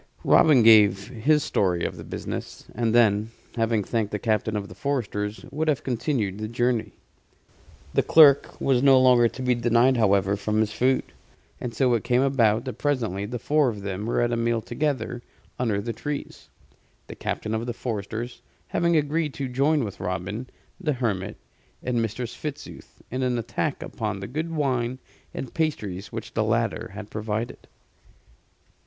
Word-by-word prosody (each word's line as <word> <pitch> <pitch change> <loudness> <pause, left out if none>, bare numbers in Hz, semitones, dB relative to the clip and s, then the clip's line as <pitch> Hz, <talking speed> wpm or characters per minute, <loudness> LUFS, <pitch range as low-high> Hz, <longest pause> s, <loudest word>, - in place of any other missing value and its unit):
Robin 140 -7 +6
gave 105 -2 +6
his 140 +5 +2
story 90 -4 0
of - - -3
the - - -9
business, - - -6
and 115 -1 0
then, 110 -2 +4 0.3
having 115 -2 +1
thanked 110 0 -1
the 105 - -1
captain 110 0 0
of 100 -1 -3
the - - -11
foresters, 110 -6 -3
would 155 +2 -2
have 150 -3 +1
continued 120 -5 -1
the 110 - -3
journey. 115 -3 0 1.0
The - - +4
clerk 145 -4 +5
was 130 -3 +2
no 135 -1 +6
longer 125 -2 +6
to 130 - -8
be 125 0 +3
denied, 120 +2 +3
however, 100 -3 +3
from 105 +2 -1
his 110 -1 +1
food: 130 +3 +2 0.6
and 125 - -4
so 125 +1 +3
it 115 - 0
came 125 +1 +2
about 120 -4 +2
that 130 - -6
presently 115 -9 -1
the 125 +3 -4
four 145 +4 +2
of 105 -3 -6
them 100 +2 -4
were 120 - +1
at 120 0 +1
a - - +1
meal 115 0 +1
together 125 0 -2 0.4
under 110 -5 +1
the 115 +3 -3
trees 145 +2 -6 0.6
the - - -9
captain 110 - -3
of 110 +2 -2
the - - -1
foresters 115 0 -5 0.3
having 170 -1 +2
agreed 150 0 0
to 135 - -3
join 140 +3 +2
with 100 -4 -6
Robin, 95 +7 -4 0.3
the 155 -6 0
hermit, 105 -6 -2 0.5
and 120 -2 0
Mistress 115 +2 -3
Fitzooth 150 -1 -8
in 130 +2 -2
an 125 -1 +1
attack 120 +5 -2
upon 105 -4 -4
the 95 - -5
good 155 +9 -3
wine 130 -5 -1 0.3
and 130 - -6
pasty 110 - -2
which 110 -1 -7
the 110 - +1
latter 115 0 0
had 105 0 -8
provided. 110 +1 -4
120 Hz, 170 wpm, -25 LUFS, 105-130 Hz, 1.0 s, Robin